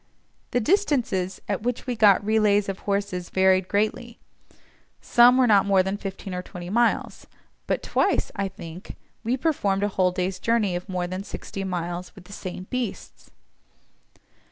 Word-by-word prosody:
The 245 - +1
distances 245 - +1
at 200 -1 -2
which 245 +1 -2
we 250 -2 -2
got 205 -2 +5
relays 210 -2 +3
of 195 -1 -4
horses 200 -3 -1
varied 190 -1 +3
greatly; 215 +4 -1 0.8
some 245 +1 +5
were 260 - +5
not 205 -4 +4
more 195 -2 +4
than 190 +1 -2
fifteen 195 -2 -6
or 180 - -3
twenty 180 0 -8
miles, 235 +2 0 0.4
but - - -1
twice, - - +1
I 200 -1 -1
think, 185 -2 -10 0.3
we 240 +3 0
performed 205 -10 0
a - - +3
whole 185 -2 +2
day's 185 +1 -2
journey 220 -5 +1
of 180 +3 -6
more 180 -1 -2
than 185 +2 -5
sixty 195 -1 -6
miles 175 -1 -4
with 190 - -13
the 200 - -12
same 185 -2 -6
beasts. 250 -4 -5
195 Hz, 160 wpm, -25 LUFS, 185-225 Hz, 0.8 s, got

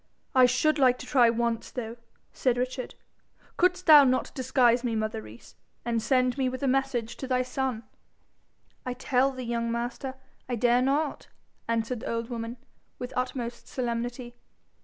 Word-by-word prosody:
'I 255 -2 +7
should 290 +5 +2
like 255 -2 +5
to - - -9
try 245 -4 +4
once, 230 0 -1
though,' 230 -2 -6 0.4
said 250 -2 +1
Richard. 255 +1 -3 0.6
'Couldst 365 0 +2
thou 300 -2 +9
not 255 -1 +1
disguise 250 -2 +2
me, 235 -2 -1
mother 215 - -2
Rees, 110 +2 -14 0.3
and 230 -1 0
send 255 +1 +1
me 260 -1 +2
with 255 +2 -6
a - - +2
message 255 -3 0
to 265 - -5
thy 255 -1 +1
son?' 255 -2 -3 1.0
'I 250 - -3
tell 265 +1 +1
thee, 255 -1 -7
young 235 -1 -2
master, 240 +3 -3 0.3
I 245 - 0
dare 240 +2 +3
not,' 285 +3 0 0.4
answered 230 +1 -1
the - - -6
old 230 +1 -3
woman, 230 +1 -5 0.4
with 250 0 -6
utmost 245 -1 -3
solemnity. 240 0 -3
250 Hz, 160 wpm, -27 LUFS, 235-260 Hz, 1.0 s, thou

